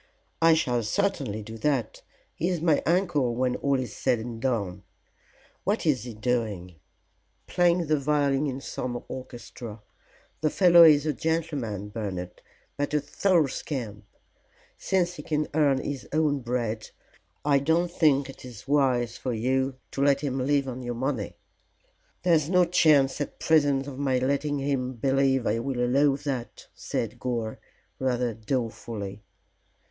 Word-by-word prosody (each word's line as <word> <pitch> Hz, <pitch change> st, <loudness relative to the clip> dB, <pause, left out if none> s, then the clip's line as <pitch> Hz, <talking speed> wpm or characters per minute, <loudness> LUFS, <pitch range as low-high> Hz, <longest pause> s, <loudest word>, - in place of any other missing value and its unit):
"I 165 Hz, 0 st, +6 dB
shall 125 Hz, -6 st, +1 dB
certainly 110 Hz, -, -1 dB
do 110 Hz, +2 st, -9 dB
that. 130 Hz, -4 st, -1 dB, 0.3 s
He 175 Hz, -, -1 dB
is 180 Hz, -2 st, -1 dB
my 160 Hz, -2 st, +2 dB
uncle 165 Hz, -9 st, +1 dB
when 125 Hz, 0 st, 0 dB
all 140 Hz, -1 st, +1 dB
is 125 Hz, -5 st, -5 dB
said 120 Hz, -, +1 dB
and 115 Hz, 0 st, -6 dB
done. 100 Hz, -8 st, -1 dB, 0.8 s
What 205 Hz, 0 st, 0 dB
is 130 Hz, -7 st, +1 dB
he 120 Hz, -3 st, -7 dB
doing?" 105 Hz, -7 st, -2 dB, 0.7 s
"Playing 175 Hz, -1 st, +2 dB
the 155 Hz, -1 st, +1 dB
violin 145 Hz, 0 st, +1 dB
in 135 Hz, 0 st, -4 dB
some 120 Hz, -2 st, -4 dB
orchestra. 120 Hz, -3 st, -8 dB, 0.6 s
The 155 Hz, -, +1 dB
fellow 175 Hz, 0 st, +6 dB
is 150 Hz, -2 st, +6 dB
a 155 Hz, -, +1 dB
gentleman, 145 Hz, -, -2 dB
Bernard, 95 Hz, -5 st, -5 dB, 0.4 s
but 145 Hz, +1 st, -1 dB
a -, -, +4 dB
thorough 165 Hz, +3 st, +2 dB
scamp. 120 Hz, -6 st, -5 dB, 0.7 s
Since 175 Hz, -2 st, 0 dB
he -, -, -6 dB
can 150 Hz, -1 st, -1 dB
earn 145 Hz, -3 st, +3 dB
his 135 Hz, 0 st, -5 dB
own 150 Hz, -2 st, +1 dB
bread 120 Hz, -3 st, -3 dB, 0.6 s
I 140 Hz, -2 st, +4 dB
don't 165 Hz, +5 st, +1 dB
think 145 Hz, -6 st, +3 dB
it 135 Hz, -, -11 dB
is 125 Hz, -2 st, -11 dB
wise 130 Hz, -5 st, +2 dB
for 125 Hz, -, -3 dB
you 130 Hz, +3 st, 0 dB, 0.2 s
to 135 Hz, -, -3 dB
let 140 Hz, 0 st, +3 dB
him 135 Hz, -3 st, -2 dB
live 140 Hz, +1 st, +1 dB
on 130 Hz, 0 st, -5 dB
your 120 Hz, -1 st, -4 dB
money." 130 Hz, -3 st, -3 dB, 0.9 s
"There's 165 Hz, -4 st, +3 dB
no 180 Hz, -1 st, +5 dB
chance 150 Hz, -6 st, +3 dB
at 145 Hz, -, -4 dB
present 145 Hz, -4 st, +3 dB
of 140 Hz, -1 st, -8 dB
my 135 Hz, -2 st, +1 dB
letting 140 Hz, +3 st, 0 dB
him 135 Hz, -2 st, -1 dB
believe 135 Hz, +1 st, +1 dB
I 110 Hz, +2 st, +1 dB
will 125 Hz, +1 st, -3 dB
allow 135 Hz, +3 st, +3 dB
that," 135 Hz, -5 st, -5 dB
said -, -, -4 dB
Gore, 115 Hz, -3 st, -3 dB, 0.4 s
rather 125 Hz, -2 st, 0 dB
dolefully. 110 Hz, -3 st, -4 dB
135 Hz, 150 wpm, -26 LUFS, 120-150 Hz, 0.9 s, I